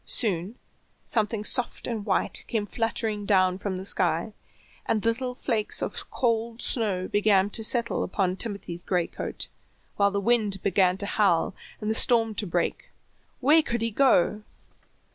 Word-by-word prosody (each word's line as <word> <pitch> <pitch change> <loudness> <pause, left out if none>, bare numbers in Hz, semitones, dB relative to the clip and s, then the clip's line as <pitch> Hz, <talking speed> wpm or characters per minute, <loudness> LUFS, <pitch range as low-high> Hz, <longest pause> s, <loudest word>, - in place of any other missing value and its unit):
Soon 195 -1 -1 0.5
something 215 -1 0
soft 245 +3 +1
and 225 -4 -4
white - - +1
came 220 -3 -1
fluttering 225 -1 -2
down 185 -2 +2
from 195 -2 -3
the 190 - -6
sky, 180 +2 +1 0.5
and 215 0 0
little 250 +2 -1
flakes 225 -4 0
of - - -5
cold 230 -1 -1
snow 200 -8 +1
began 205 -1 +2
to 225 - +1
settle 235 +1 +1
upon 185 -1 -1
Timothy's 195 -5 -5
gray 180 -3 0
coat, - - -5 0.5
while 200 0 +4
the 200 0 -2
wind 210 -2 +1
began 190 -1 +2
to 200 - -4
howl, 195 -4 +1 0.3
and 215 - -5
the 220 - +1
storm 225 -1 +3
to 210 -1 -3
break. 175 0 -2 0.5
Where 300 +5 +5
could 235 -6 -3
he 230 - -1
go? 215 -4 +3
210 Hz, 155 wpm, -26 LUFS, 190-230 Hz, 0.5 s, Where